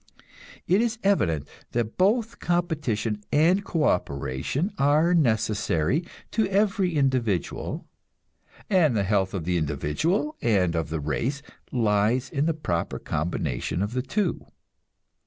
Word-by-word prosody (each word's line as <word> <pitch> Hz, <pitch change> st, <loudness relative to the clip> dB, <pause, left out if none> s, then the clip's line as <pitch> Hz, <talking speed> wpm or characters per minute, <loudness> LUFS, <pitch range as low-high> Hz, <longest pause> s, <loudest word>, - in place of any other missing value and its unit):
It 190 Hz, +6 st, +3 dB
is 235 Hz, -1 st, 0 dB
evident 80 Hz, -, +1 dB, 0.3 s
that 115 Hz, -2 st, -1 dB
both 220 Hz, +4 st, +1 dB
competition 145 Hz, -12 st, -1 dB
and 175 Hz, +7 st, +4 dB
co 165 Hz, -5 st, -1 dB
operation 70 Hz, -, -1 dB
are 150 Hz, +5 st, +4 dB
necessary 110 Hz, -, +1 dB, 0.3 s
to 220 Hz, -2 st, +1 dB
every 195 Hz, -3 st, +1 dB
individual, 130 Hz, -, 0 dB, 0.8 s
and 165 Hz, -, +3 dB
the 100 Hz, -, +2 dB
health 95 Hz, -1 st, +1 dB
of 90 Hz, -, -3 dB
the 90 Hz, +2 st, 0 dB
individual 80 Hz, -, -1 dB
and 95 Hz, -7 st, +2 dB
of 80 Hz, -2 st, -1 dB
the 80 Hz, 0 st, -2 dB
race 120 Hz, -, -2 dB, 0.3 s
lies 110 Hz, +2 st, +1 dB
in 150 Hz, -1 st, 0 dB
the 165 Hz, -, +1 dB
proper 85 Hz, -, -2 dB
combination 75 Hz, 0 st, -2 dB
of 105 Hz, +3 st, -3 dB
the 130 Hz, -, 0 dB
two. 190 Hz, +7 st, -2 dB
125 Hz, 125 wpm, -26 LUFS, -, 0.8 s, and